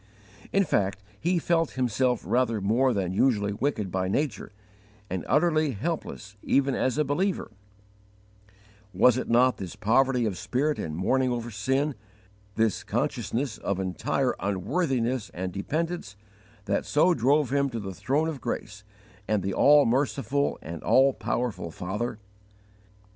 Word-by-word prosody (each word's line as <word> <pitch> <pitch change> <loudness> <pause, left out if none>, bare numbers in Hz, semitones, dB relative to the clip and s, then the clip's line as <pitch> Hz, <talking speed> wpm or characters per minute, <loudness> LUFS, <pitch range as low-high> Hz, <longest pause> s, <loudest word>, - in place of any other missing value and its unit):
In 195 - +3
fact 100 - 0 0.2
he 175 +3 +1
felt 165 -1 +1
himself 125 -1 +1
rather 120 -3 +1
more 115 +7 +2
than 95 -5 -1
usually 105 -2 +2
wicked 105 -5 -2
by 95 0 -1
nature, 130 +4 -2 0.6
and 95 -1 -2
utterly 155 -3 +2
helpless 110 - -4
even 140 0 +2
as 130 +1 0
a 150 - +3
believer: 175 - -1 1.4
was 120 +5 +5
it - - -5
not 125 +2 +4
this 90 -3 -7
poverty 125 +2 +2
of 100 -5 -2
spirit 130 +9 -1
and 75 -1 -4
mourning 130 +9 +1
over 120 -1 -3
sin, 135 +8 0 0.6
this 110 -3 +1
consciousness 125 -1 -2
of 100 -1 -2
entire 95 -2 0
unworthiness 120 - -1
and 90 0 -4
dependence, 155 - -3 0.5
that 100 -1 0
so 170 +5 +3
drove 135 +1 +2
him 140 -1 +2
to 115 -3 -4
the 95 -2 -6
throne 145 - 0
of 150 -6 -5
grace 105 -1 -5 0.4
and 105 -3 +1
the 95 - -2
all 145 +5 +6
merciful 135 +2 0
and 80 0 -7
all 135 +1 +4
powerful 120 -10 -2
Father? 105 +8 -4
125 Hz, 140 wpm, -27 LUFS, 100-140 Hz, 1.4 s, all